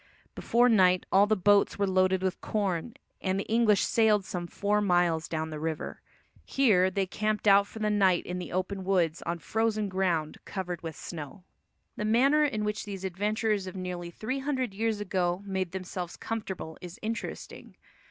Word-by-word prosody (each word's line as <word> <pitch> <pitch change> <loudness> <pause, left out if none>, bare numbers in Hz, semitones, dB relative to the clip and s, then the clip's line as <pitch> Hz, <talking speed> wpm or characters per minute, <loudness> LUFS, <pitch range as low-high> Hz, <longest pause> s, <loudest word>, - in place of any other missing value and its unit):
Before 240 +2 +3
night 185 -6 +4
all 200 +2 +5
the 215 - +3
boats 205 +1 +3
were 200 - +2
loaded 185 0 +2
with 185 -1 -2
corn, 200 0 -2 0.3
and 190 0 0
the - - -1
English 220 -3 +3
sailed 215 -3 +3
some 175 -2 -4
four 205 +3 0
miles 175 -4 +2
down 160 -1 -3
the 155 - -5
river. 160 0 -4 0.4
Here 205 -9 +3
they 195 +1 0
camped 215 +2 -2
out 200 0 +6
for - - -12
the 215 -1 0
night 190 -4 +3
in 180 0 -4
the 180 - -6
open 185 +1 -2
woods 180 -4 +1
on 170 +1 -1
frozen 215 +2 -1
ground 180 -5 -1
covered 180 -3 -5
with 160 -2 -6
snow. 165 +3 -8 0.5
The 210 - -2
manner 270 +8 +4
in 230 -8 0
which 210 0 -2
these 195 -2 -6
adventurers 205 +2 -1
of 185 - -7
nearly 180 -2 -5
three 245 +10 -4
hundred 260 -5 -2
years 220 +1 -1
ago 185 -2 -1
made 190 -3 -2
themselves 185 -1 -5
comfortable 190 -7 -5
is 180 0 -9
interesting. 225 +1 -6
195 Hz, 175 wpm, -28 LUFS, 180-215 Hz, 0.5 s, out